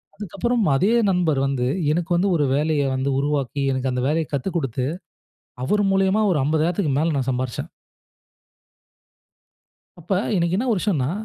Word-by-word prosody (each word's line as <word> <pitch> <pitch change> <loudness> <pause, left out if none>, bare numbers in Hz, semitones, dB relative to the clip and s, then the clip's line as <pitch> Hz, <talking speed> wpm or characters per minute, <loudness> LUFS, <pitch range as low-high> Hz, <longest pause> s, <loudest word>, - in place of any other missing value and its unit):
அதுகப்புறம் 215 +4 -1
அதே 190 +10 +2 0.2
நண்பர் 170 -6 +1
வந்து 135 -3 -1 0.3
எனக்கு 170 +2 -1
வந்து 180 +3 +2
ஒரு 145 -3 +2
வேலைய 150 0 +1
வந்து 135 +1 -1
உருவாக்கி 140 -1 -1
எனக்கு 130 0 -1
அந்த 125 - -1
வேலைய 160 +2 0
கத்துக்குடுத்து 135 -4 -2 0.8
அவர் 205 +9 +1
மூலியமா 195 +2 +2
ஒரு 165 - +2
50,000க்கு 160 +1 0
மேல 160 0 +1
நான் 135 -1 -1
சம்பாரிச்சேன். 130 +5 -3 2.3
அப்ப 175 +4 -5 0.2
இன்னைக்கு 170 +1 +1
என்ன 255 - -1
விஷயம்னா, 155 -9 0
155 Hz, 135 wpm, -22 LUFS, 135-180 Hz, 2.3 s, அதே